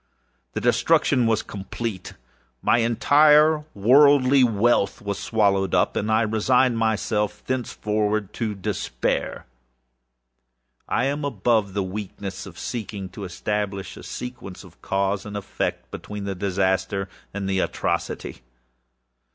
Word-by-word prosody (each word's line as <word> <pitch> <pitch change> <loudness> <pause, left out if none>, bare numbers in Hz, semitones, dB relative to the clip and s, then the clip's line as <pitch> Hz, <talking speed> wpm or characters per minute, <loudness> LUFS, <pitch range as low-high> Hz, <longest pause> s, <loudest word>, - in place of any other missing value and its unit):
The - - -3
destruction 120 +1 +3
was 110 -1 +1
complete. 100 0 -6 0.5
My 120 - +4
entire 150 +6 +4
worldly 135 +4 +5
wealth 110 -3 +2
was 100 -1 -4
swallowed 100 -4 +1
up, - - +2
and 105 +2 -1
I 110 +1 +3
resigned 115 +3 +2
myself 105 -1 -1
thenceforward 105 -4 -1
to 110 -3 -3
despair. 100 0 -2 1.4
I - - +1
am 140 +2 -1
above 110 -6 0
the 100 - +1
weakness 95 0 -6
of 85 -3 -12
seeking 100 -3 -5
to 100 +2 -8
establish 100 +1 -3
a - - -10
sequence 125 -8 -8
of 85 -3 -17
cause 100 0 -1
and 105 -1 -6
effect, 100 - -4
between 105 -1 -7
the 100 0 -3
disaster 95 0 0 0.2
and 100 -1 -4
the 95 -1 0
atrocity. - - -2
105 Hz, 120 wpm, -24 LUFS, 100-120 Hz, 1.4 s, worldly